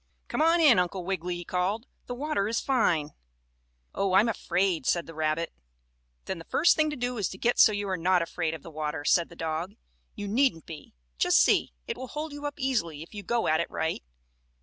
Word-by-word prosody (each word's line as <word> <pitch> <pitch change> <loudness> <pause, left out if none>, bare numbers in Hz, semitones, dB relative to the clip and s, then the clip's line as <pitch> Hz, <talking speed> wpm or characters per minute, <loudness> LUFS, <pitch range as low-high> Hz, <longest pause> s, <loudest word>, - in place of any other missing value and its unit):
"Come - - -1
on 330 +2 +4
in, 285 - +6
Uncle 180 0 -2
Wiggily," 180 -1 -2
he 175 0 -7
called. 195 +6 -1 0.2
"The 245 - -4
water 270 -7 -1
is 230 +1 0
fine." 170 - +1 0.8
"Oh, 195 -1 0
I'm 200 +5 +5
afraid!" 190 - 0
said 170 -1 +1
the 165 - -10
rabbit. 155 +1 -1 0.7
"Then 190 - -4
the 165 - -10
first 335 - +4
thing 310 -1 +2
to 300 - -4
do 245 -2 -3
is 200 - 0
to 190 - -8
get 240 +4 +1
so - - +8
you 205 -1 -2
are 190 -1 -1
not 180 +1 +2
afraid 165 -1 -2
of 155 - -11
the 165 - -10
water," 150 -1 -4
said 170 +2 +3
the - - -13
dog. 165 +5 -3 0.4
"You 205 -2 -5
needn't 230 - +1
be. 155 - -11 0.2
Just - - +4
see; - - +3
it - - -4
will 260 - -6
hold 300 +3 -5
you 290 0 -4
up 290 - -6
easily 195 - -1
if 170 - -17
you 205 - -6
go 235 +4 0
at 155 0 +3
it 170 - -1
right. 160 - -2
190 Hz, 220 wpm, -28 LUFS, 165-245 Hz, 0.8 s, so